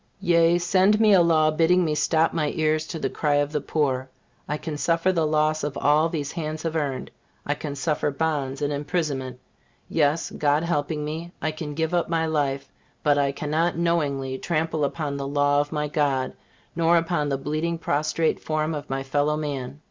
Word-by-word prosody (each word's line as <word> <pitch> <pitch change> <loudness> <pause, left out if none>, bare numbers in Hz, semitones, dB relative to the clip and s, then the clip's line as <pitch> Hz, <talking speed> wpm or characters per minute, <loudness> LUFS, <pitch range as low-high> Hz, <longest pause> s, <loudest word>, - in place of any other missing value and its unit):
Yea, 170 0 +4
send 190 +4 +3
me 215 -2 +5
a 185 - +7
law 160 -2 +4
bidding 170 +3 +3
me 155 - 0
stop 160 +1 +2
my 155 -3 0
ears 155 0 +1
to 165 - -5
the - - -1
cry 150 -2 0
of 145 0 +1
the 150 -2 -1
poor, 135 -3 -1 0.4
I 150 - -1
can 155 0 -5
suffer 165 +4 +1
the 165 -4 +1
loss 155 0 +1
of 145 -1 -3
all 150 +3 +3
these 150 -3 -3
hands 155 -2 -4
have 165 -1 -2
earned, 140 -4 -2 0.3
I 145 - +1
can 145 -1 -6
suffer 150 +1 0
bonds 145 -2 -2
and 145 0 0
imprisonment 140 -4 -2 0.5
yes, 155 0 +1
God 150 +1 +1
helping 150 -2 -1
me, 165 +3 -5
I 155 - -1
can 155 -1 -6
give 160 +2 -1
up 175 -2 +1
my 165 -1 +1
life 140 -4 -1 0.4
but 145 -1 +3
I 140 -1 +2
cannot 155 +4 -1
knowingly 140 -6 0
trample 160 -2 0
upon 145 -1 -3
the 140 0 -4
law 145 0 +2
of 145 - -5
my 150 -1 -1
God, 140 -3 0 0.4
nor 170 +1 +4
upon 165 -3 0
the 135 - 0
bleeding, 155 +4 -2
prostrate 155 +1 0
form 155 0 -1
of 145 -2 -6
my 135 0 -2
fellow 145 +2 0
man. 140 -3 -4
155 Hz, 195 wpm, -24 LUFS, 145-165 Hz, 0.5 s, a